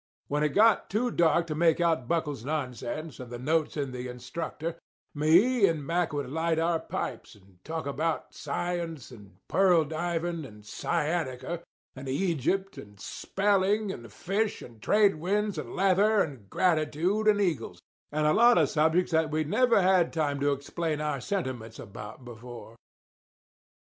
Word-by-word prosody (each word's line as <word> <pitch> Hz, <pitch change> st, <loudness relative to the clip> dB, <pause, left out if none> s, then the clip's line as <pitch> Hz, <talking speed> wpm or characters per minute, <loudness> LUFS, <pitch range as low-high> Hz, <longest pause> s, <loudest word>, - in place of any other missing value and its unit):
When 145 Hz, +1 st, 0 dB
it 150 Hz, -, +3 dB
got 220 Hz, +1 st, +5 dB
too 240 Hz, +4 st, 0 dB
dark 170 Hz, -2 st, +3 dB
to 160 Hz, -, -3 dB
make 165 Hz, +1 st, +3 dB
out 165 Hz, -8 st, +1 dB
Buckle's 150 Hz, -6 st, -1 dB
nonsense 145 Hz, +1 st, -4 dB
and 125 Hz, -2 st, -8 dB
the 120 Hz, -, -5 dB
notes 155 Hz, +5 st, 0 dB
in 140 Hz, -3 st, -2 dB
the 125 Hz, 0 st, -5 dB
Instructor, 155 Hz, +7 st, -5 dB, 0.3 s
me 195 Hz, +10 st, +4 dB
and 155 Hz, -4 st, -2 dB
Mack 170 Hz, +2 st, 0 dB
would 145 Hz, -1 st, -3 dB
light 160 Hz, +4 st, 0 dB
our 165 Hz, 0 st, +1 dB
pipes -, -, -5 dB
and 95 Hz, -2 st, -23 dB
talk 160 Hz, 0 st, -4 dB
about 150 Hz, +3 st, -2 dB
science 165 Hz, -2 st, -4 dB
and 100 Hz, -6 st, -14 dB
pearl 180 Hz, -4 st, +4 dB
diving 170 Hz, +1 st, -2 dB
and 105 Hz, -6 st, -12 dB
sciatica 150 Hz, +4 st, -2 dB, 0.3 s
and 130 Hz, 0 st, -7 dB
Egypt 185 Hz, +5 st, -1 dB
and 105 Hz, -1 st, -13 dB
spelling 200 Hz, -, 0 dB
and 115 Hz, -, -9 dB
fish 205 Hz, -, -2 dB
and 115 Hz, -3 st, -13 dB
trade 205 Hz, -4 st, +4 dB
winds 205 Hz, +5 st, -1 dB
and -, -, -7 dB
leather 195 Hz, +3 st, +4 dB
and 125 Hz, -10 st, -9 dB
gratitude 180 Hz, +5 st, +1 dB
and 210 Hz, -1 st, +5 dB
eagles, 140 Hz, -, -1 dB, 0.3 s
and 155 Hz, +1 st, 0 dB
a 150 Hz, -, +4 dB
lot 240 Hz, +4 st, +6 dB
of 155 Hz, -5 st, +4 dB
subjects 160 Hz, +4 st, +2 dB
that 160 Hz, -1 st, +2 dB
we'd 155 Hz, 0 st, -1 dB
never 230 Hz, 0 st, +4 dB
had 185 Hz, -2 st, +4 dB
time 145 Hz, -4 st, -1 dB
to 145 Hz, +1 st, +2 dB
explain 150 Hz, +3 st, -2 dB
our 150 Hz, -3 st, -2 dB
sentiments 125 Hz, -, -4 dB
about 105 Hz, +4 st, -9 dB
before. 120 Hz, -1 st, -10 dB
160 Hz, 160 wpm, -28 LUFS, 135-180 Hz, 0.3 s, lot